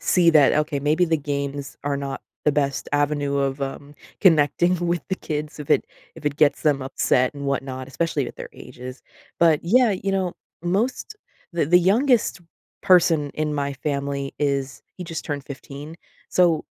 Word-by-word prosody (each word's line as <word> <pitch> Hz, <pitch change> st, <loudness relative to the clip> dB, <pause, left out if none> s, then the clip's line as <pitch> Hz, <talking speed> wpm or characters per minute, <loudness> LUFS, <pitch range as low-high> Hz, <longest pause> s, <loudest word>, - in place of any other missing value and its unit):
see 175 Hz, -2 st, +4 dB
that, 150 Hz, -4 st, +6 dB
"Okay, 150 Hz, -2 st, 0 dB
maybe 155 Hz, +5 st, +2 dB
the 160 Hz, -1 st, +1 dB
games 140 Hz, -1 st, -4 dB
are 145 Hz, -1 st, 0 dB
not 140 Hz, -1 st, -4 dB, 0.2 s
the 150 Hz, -, +3 dB
best 140 Hz, -1 st, -1 dB
avenue 145 Hz, -1 st, +1 dB
of, 140 Hz, 0 st, -1 dB
um, 140 Hz, +1 st, -6 dB, 0.3 s
connecting 170 Hz, +1 st, +4 dB
with 170 Hz, 0 st, 0 dB
the 190 Hz, -, 0 dB
kids 150 Hz, -2 st, -5 dB
if 145 Hz, -, -8 dB
it -, -, +3 dB, 0.3 s
if 150 Hz, -, -9 dB
it 145 Hz, 0 st, 0 dB
gets 150 Hz, -2 st, +3 dB
them 145 Hz, -3 st, +2 dB
upset 130 Hz, -1 st, +1 dB
and 140 Hz, -1 st, -6 dB
whatnot, 130 Hz, -1 st, -3 dB
especially 150 Hz, -1 st, -1 dB
with -, -, -9 dB
their -, -, -8 dB
ages." 130 Hz, +1 st, -10 dB, 0.4 s
But, 165 Hz, -3 st, +4 dB
yeah, 235 Hz, +7 st, +4 dB
you 195 Hz, +1 st, -2 dB
know, 185 Hz, -2 st, -1 dB, 0.3 s
most 230 Hz, -, -1 dB, 0.4 s
the 170 Hz, -2 st, +1 dB
the 175 Hz, +4 st, +6 dB
youngest 220 Hz, +4 st, +2 dB, 0.4 s
person 165 Hz, -5 st, +4 dB
in 155 Hz, -1 st, -1 dB
my 140 Hz, -1 st, -1 dB
family 140 Hz, 0 st, -3 dB
is 140 Hz, -2 st, -1 dB
he 180 Hz, -, -6 dB
just 165 Hz, -2 st, -5 dB
turned 145 Hz, -2 st, -4 dB
15, 140 Hz, +3 st, -9 dB, 0.3 s
so, 170 Hz, -4 st, +3 dB
150 Hz, 170 wpm, -23 LUFS, 140-170 Hz, 0.4 s, that